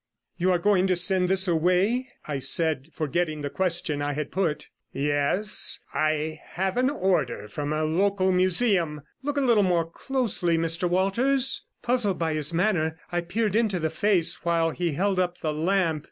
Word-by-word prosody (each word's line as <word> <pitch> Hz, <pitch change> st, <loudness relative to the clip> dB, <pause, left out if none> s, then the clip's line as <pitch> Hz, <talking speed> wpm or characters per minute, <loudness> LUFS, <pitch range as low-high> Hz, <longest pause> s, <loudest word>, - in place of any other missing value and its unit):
'You 185 Hz, +1 st, 0 dB
are 180 Hz, -, +3 dB
going 195 Hz, 0 st, +2 dB
to 185 Hz, -, +2 dB
send 180 Hz, +1 st, +2 dB
this 190 Hz, 0 st, +2 dB
away?' 185 Hz, +9 st, +1 dB, 0.2 s
I 145 Hz, -3 st, -2 dB
said, 140 Hz, +1 st, 0 dB
forgetting 155 Hz, 0 st, -2 dB
the 145 Hz, -, -3 dB
question 175 Hz, -5 st, -1 dB
I 145 Hz, 0 st, -1 dB
had 150 Hz, 0 st, -4 dB
put. 160 Hz, -6 st, -1 dB, 0.2 s
'Yes; 145 Hz, +9 st, +1 dB, 0.2 s
I 155 Hz, +1 st, -1 dB
have 190 Hz, +1 st, -3 dB
an 255 Hz, +1 st, +3 dB
order 190 Hz, -, -1 dB
from 145 Hz, +6 st, -4 dB
a 155 Hz, 0 st, 0 dB
local 190 Hz, +4 st, +1 dB
museum. 180 Hz, -4 st, +1 dB, 0.2 s
Look 290 Hz, +1 st, -3 dB
a -, -, +2 dB
little 235 Hz, -5 st, +4 dB
more 175 Hz, -4 st, +2 dB
closely, 185 Hz, -4 st, 0 dB
Mr 165 Hz, +2 st, 0 dB
Walters.' 245 Hz, +9 st, +1 dB, 0.2 s
Puzzled 240 Hz, -6 st, +1 dB
by 165 Hz, -2 st, -1 dB
his 150 Hz, 0 st, -1 dB
manner, 165 Hz, -3 st, 0 dB
I 175 Hz, 0 st, 0 dB
peered 205 Hz, +4 st, -1 dB
into 220 Hz, -4 st, +1 dB
the 160 Hz, -2 st, -2 dB
face, 180 Hz, -1 st, +2 dB
while 165 Hz, -1 st, +1 dB
he 170 Hz, -1 st, -2 dB
held 190 Hz, +4 st, 0 dB
up 180 Hz, -1 st, -1 dB
the 155 Hz, -1 st, -3 dB
lamp. 165 Hz, 0 st, +1 dB
175 Hz, 170 wpm, -25 LUFS, 155-195 Hz, 0.2 s, little